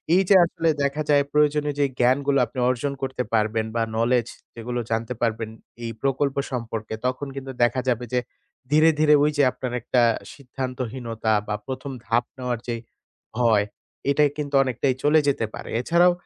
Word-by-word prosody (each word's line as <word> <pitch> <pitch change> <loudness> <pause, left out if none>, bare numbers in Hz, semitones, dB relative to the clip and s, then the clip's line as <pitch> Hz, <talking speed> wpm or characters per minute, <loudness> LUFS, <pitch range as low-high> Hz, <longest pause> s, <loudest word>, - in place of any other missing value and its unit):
এই 190 - +5
যে 200 - +7
আসলে 165 -1 -1
দেখা 140 +2 0
যায় 145 -1 +5
প্রয়োজনীয় 150 -1 +2
যে 145 - +4
জ্ঞানগুলো 140 +3 +3
আপনি 130 - -7
অর্জন 130 +3 -1
করতে 130 -1 -2
পারবেন, 110 0 +1
বা 115 - +1
knowledge 115 +1 +1 0.2
যেগুলো 120 +1 -4
জানতে 115 +2 -1
পারবেন 115 -1 -1 0.3
এই 115 - -3
প্রকল্প 135 0 0 0.2
সম্পর্কে 115 -3 -4
তখন 130 +3 -1
কিন্তু 135 -1 -6
দেখা 120 +2 +2
যাবে 120 0 0
যে 125 - +3 0.5
ধীরে, 155 +2 +6
ধীরে 155 -1 +5
ওই 150 - +3
যে 145 - +5
আপনার 125 -1 -5
একটা 125 +1 +2 0.3
সিদ্ধান্তহীনতা 125 -4 -3
বা 105 - -1
১ম 130 +1 -5
ধাপ 115 +4 +2
নেওয়ার 125 -2 -2
যে 120 - -1 0.6
ভয়, 110 -4 +3 0.5
এটা 150 +1 +3
কিন্তু 145 -1 -3
অনেকটাই 130 +1 0
চলে 150 +2 +5
যেতে 135 -5 +1
পারে। - - -8
এছাড়াও 170 +6 +4
130 Hz, 165 wpm, -24 LUFS, 115-140 Hz, 0.6 s, যে